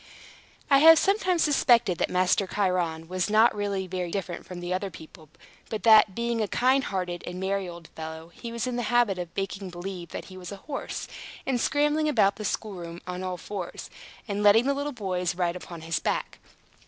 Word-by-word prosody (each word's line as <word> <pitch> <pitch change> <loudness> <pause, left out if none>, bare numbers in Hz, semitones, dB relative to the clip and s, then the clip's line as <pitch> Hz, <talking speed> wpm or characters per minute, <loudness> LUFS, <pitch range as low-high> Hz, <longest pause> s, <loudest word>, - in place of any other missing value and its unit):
I 275 - +7
have 325 +2 +9
sometimes 375 -3 +2
suspected 240 - +3
that - - +1
Master 185 +2 +2
Chiron 180 -5 -1
was 185 +2 -1
not 220 +3 +5
really 200 -2 -2
very 180 -1 -3
different 185 -1 -4
from 180 - -7 0.2
other 195 +2 -2
people, 160 -2 -13 0.4
but 220 - -4
that, 215 -4 +7
being 235 -1 -1
a 215 - 0
kind 260 +5 +2
hearted 180 -2 -3
and 180 +1 -5
merry 190 -1 -1
old 170 -2 -10
fellow, 160 +1 -8
he 230 +6 -8
was 235 -1 -2
in 250 -1 -2
the - - 0
habit 240 -6 +3
of 175 -1 -4
making 195 0 -3
believe 175 -1 -7
that - - -6
he 185 - -11
was 180 0 -8
a - - -5
horse, 285 -2 -5 0.4
and 250 -3 0
scrambling 295 +2 +2
about 205 -8 +3
the 215 - -5
schoolroom 175 -6 -4
on 180 0 -5
all 185 -1 -3
fours, 200 +4 -7 0.4
and 205 -1 -2
letting 210 +3 +6
the 280 - +2
little 285 +1 -3
boys 185 -7 -2
ride 175 -1 0
upon 175 -2 -8
his 160 0 -1
back. - - -2
195 Hz, 195 wpm, -27 LUFS, 180-235 Hz, 0.4 s, have